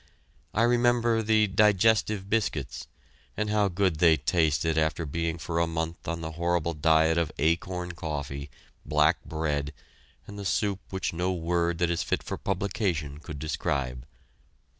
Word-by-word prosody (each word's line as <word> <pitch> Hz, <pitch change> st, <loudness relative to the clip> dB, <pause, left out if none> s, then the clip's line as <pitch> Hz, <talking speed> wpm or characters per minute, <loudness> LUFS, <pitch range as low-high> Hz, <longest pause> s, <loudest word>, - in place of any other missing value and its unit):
I 110 Hz, -, +3 dB
remember 120 Hz, -1 st, +3 dB
the 110 Hz, 0 st, +3 dB
"Digestive 105 Hz, 0 st, +3 dB
Biscuits," 75 Hz, -, -2 dB, 0.5 s
and 105 Hz, 0 st, -1 dB
how 105 Hz, -1 st, +3 dB
good 95 Hz, -4 st, 0 dB
they 80 Hz, -2 st, +6 dB
tasted 80 Hz, +2 st, +1 dB
after 80 Hz, +1 st, 0 dB
being 85 Hz, +3 st, -2 dB
for 85 Hz, 0 st, -2 dB
a 85 Hz, -, +2 dB
month 80 Hz, 0 st, -4 dB
on 85 Hz, 0 st, -3 dB
the 80 Hz, 0 st, -4 dB
horrible 85 Hz, 0 st, 0 dB
diet 80 Hz, +1 st, +3 dB
of 80 Hz, -2 st, -1 dB
acorn 90 Hz, +3 st, 0 dB
coffee, 70 Hz, -4 st, -5 dB, 0.3 s
black 75 Hz, +1 st, +2 dB
bread, 75 Hz, -2 st, -2 dB, 0.5 s
and 100 Hz, 0 st, -9 dB
the -, -, -5 dB
soup 100 Hz, 0 st, 0 dB
which 95 Hz, -3 st, -2 dB
no 90 Hz, +2 st, 0 dB
word 85 Hz, -1 st, 0 dB
that 85 Hz, 0 st, +1 dB
is 85 Hz, -, 0 dB
fit -, -, -1 dB
for -, -, -4 dB
publication 90 Hz, -7 st, -2 dB
could 80 Hz, -1 st, -8 dB
describe. 70 Hz, -4 st, -2 dB
85 Hz, 150 wpm, -27 LUFS, 80-100 Hz, 0.5 s, they